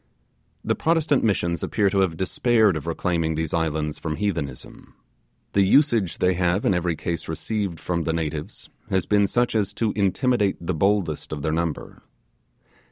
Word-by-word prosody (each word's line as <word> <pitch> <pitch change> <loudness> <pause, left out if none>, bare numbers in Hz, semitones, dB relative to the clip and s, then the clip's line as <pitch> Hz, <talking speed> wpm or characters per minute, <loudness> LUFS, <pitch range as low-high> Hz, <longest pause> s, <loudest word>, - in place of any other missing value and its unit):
The - - +2
Protestant 160 -3 +1
Missions 85 -6 0
appear 105 -3 +1
to 100 - +1
have 90 -4 +1
despaired 110 +2 +2
of 80 +1 -5
reclaiming 85 -1 -1
these 80 0 -2
islands 80 -2 -1
from 80 -2 -3
heathenism. 80 -10 -5 0.6
The 100 - +4
usage 110 - +3
they 90 0 +2
have 90 +3 0
in - - +3
every 90 -1 0
case 85 +1 -4
received 95 +1 -3
from 85 -2 -2
the 80 - +1
natives 80 -2 -4 0.2
has 95 -1 +1
been 100 -1 +3
such 120 +4 +1
as 105 -3 0
to 110 -2 0
intimidate 100 +1 +1
the 85 +2 -3
boldest 95 -2 0
of 75 -2 -5
their 80 - 0
number. 85 -1 -3
90 Hz, 165 wpm, -24 LUFS, 80-105 Hz, 0.6 s, The